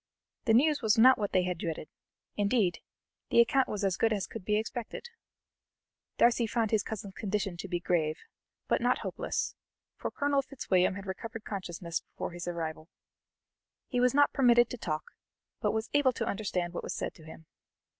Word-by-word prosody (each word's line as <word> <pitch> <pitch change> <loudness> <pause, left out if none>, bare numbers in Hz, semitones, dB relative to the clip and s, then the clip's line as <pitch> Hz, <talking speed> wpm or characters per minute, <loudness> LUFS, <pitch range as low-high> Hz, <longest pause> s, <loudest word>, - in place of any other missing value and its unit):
The 225 -3 +5
news 290 +4 +4
was 220 -2 +3
not 255 +3 +7
what 205 -2 -1
they 185 - +3
had 180 -2 -2
dreaded; 160 -2 -4 0.5
indeed, 205 -3 +2 0.5
the - - +4
account 265 +3 +4
was 210 -1 -3
as 190 -3 +1
good 225 - +2
as 200 -4 0
could 225 - -8
be 210 +2 +1
expected; 235 - -5 1.1
Darcy 235 -1 +4
found 225 -1 0
his 220 -2 +3
cousin's 200 -2 -6
condition 200 -3 -2
to 180 - -6
be 175 -2 -1
grave, 160 -3 +1 0.5
but - - +1
not - - +3
hopeless, - - -2 0.4
for - - -3
Colonel 285 -1 +1
Fitzwilliam 195 -10 +1
had 200 0 -7
recovered 220 +3 -6
consciousness 175 -4 -4
before - - -7
his 175 0 -7
arrival. 160 -2 -4 1.0
He 250 - 0
was 250 +1 +3
not 290 0 +5
permitted 240 -3 +5
to 250 - -4
talk, 155 -5 -3 0.5
but - - +2
was 220 +1 -3
able 290 -3 +4
to - - -2
understand 180 -4 -2
what - - -3
was - - -4
said - - -3
to 160 - -16
him. 160 0 -12
210 Hz, 180 wpm, -30 LUFS, 180-240 Hz, 1.1 s, not